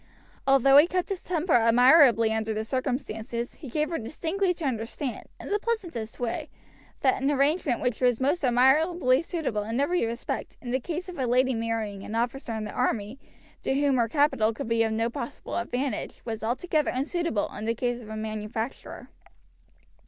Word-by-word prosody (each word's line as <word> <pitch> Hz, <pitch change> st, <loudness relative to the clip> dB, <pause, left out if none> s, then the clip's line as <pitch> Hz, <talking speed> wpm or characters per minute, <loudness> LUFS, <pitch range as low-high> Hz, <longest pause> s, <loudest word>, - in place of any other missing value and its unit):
Although 270 Hz, 0 st, +6 dB
he 300 Hz, +3 st, +8 dB
kept 365 Hz, +1 st, -1 dB
his 390 Hz, -2 st, -4 dB
temper 345 Hz, -1 st, 0 dB
admirably 240 Hz, 0 st, +6 dB
under 220 Hz, 0 st, -1 dB
the 215 Hz, -, -1 dB
circumstances, 240 Hz, -1 st, -3 dB
he 285 Hz, -, -10 dB
gave 300 Hz, +6 st, -1 dB
her 330 Hz, -, -1 dB
distinctly 335 Hz, -, -1 dB
to 330 Hz, -, -5 dB
understand, 245 Hz, +1 st, -3 dB
in -, -, -8 dB
the 415 Hz, -, +2 dB
pleasantest 350 Hz, -, -3 dB
way, 240 Hz, -2 st, -3 dB, 0.5 s
that 260 Hz, -1 st, +2 dB
an 275 Hz, -, +2 dB
arrangement 285 Hz, -1 st, +1 dB
which 250 Hz, -1 st, -1 dB
was 245 Hz, -2 st, +3 dB
most 285 Hz, +6 st, +1 dB
admirably 265 Hz, +3 st, +4 dB
suitable 320 Hz, -, -2 dB
in 225 Hz, +4 st, -3 dB
every 350 Hz, +6 st, +1 dB
respect 230 Hz, +1 st, -4 dB
in 245 Hz, -, -6 dB
the 260 Hz, -, +1 dB
case 340 Hz, +7 st, -5 dB
of 355 Hz, -5 st, -8 dB
a 255 Hz, -, 0 dB
lady 255 Hz, +2 st, +3 dB
marrying 225 Hz, -3 st, -2 dB
an 215 Hz, -, -6 dB
officer 240 Hz, 0 st, -2 dB
in 220 Hz, -, -3 dB
the 210 Hz, -, -5 dB
army, 230 Hz, -1 st, -1 dB, 0.4 s
to 265 Hz, -, 0 dB
whom 285 Hz, -2 st, +2 dB
her 235 Hz, -1 st, +2 dB
capital 270 Hz, -6 st, +2 dB
could 275 Hz, -, -5 dB
be 230 Hz, 0 st, +2 dB
of 225 Hz, -1 st, +2 dB
no 225 Hz, +1 st, 0 dB
possible 235 Hz, 0 st, -6 dB
advantage, 250 Hz, +3 st, -3 dB
was 225 Hz, -2 st, -4 dB
altogether 300 Hz, +6 st, 0 dB
unsuitable 280 Hz, -, -1 dB
in 215 Hz, -, -5 dB
the 230 Hz, +1 st, 0 dB
case 245 Hz, +1 st, -2 dB
of 215 Hz, -, -11 dB
a 220 Hz, -, -5 dB
manufacturer. 215 Hz, +2 st, -5 dB
250 Hz, 180 wpm, -27 LUFS, 225-295 Hz, 0.5 s, he